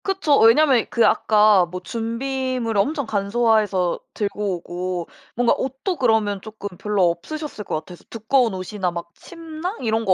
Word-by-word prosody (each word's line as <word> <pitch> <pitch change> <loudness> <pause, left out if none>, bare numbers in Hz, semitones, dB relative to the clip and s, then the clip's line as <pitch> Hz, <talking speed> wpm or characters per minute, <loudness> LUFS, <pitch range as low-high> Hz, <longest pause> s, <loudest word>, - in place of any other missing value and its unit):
그쵸. 380 -7 +2
왜냐하면 255 +1 +5
그 235 - +3
아까 210 -3 +4
뭐 180 +1 -6
준비물을 235 +2 -2
엄청 285 +4 -2
간소화해서 205 -3 +1 0.2
들고 205 -2 -2
오고 175 0 -5 0.3
뭔가 245 0 +3
옷도 270 +8 -3
그러면 220 -5 +1
쪼끔 205 -3 -8
별로 200 -3 +1
없으셨을 295 - -7
것 - - -3
같아서 165 +3 -8
두꺼운 230 0 +1
옷이나 185 0 -3
막 170 0 -7
침낭 330 - -7
이런 225 0 0
거 190 - +4
220 Hz, 330 characters per minute, -22 LUFS, 195-260 Hz, 0.3 s, 왜냐하면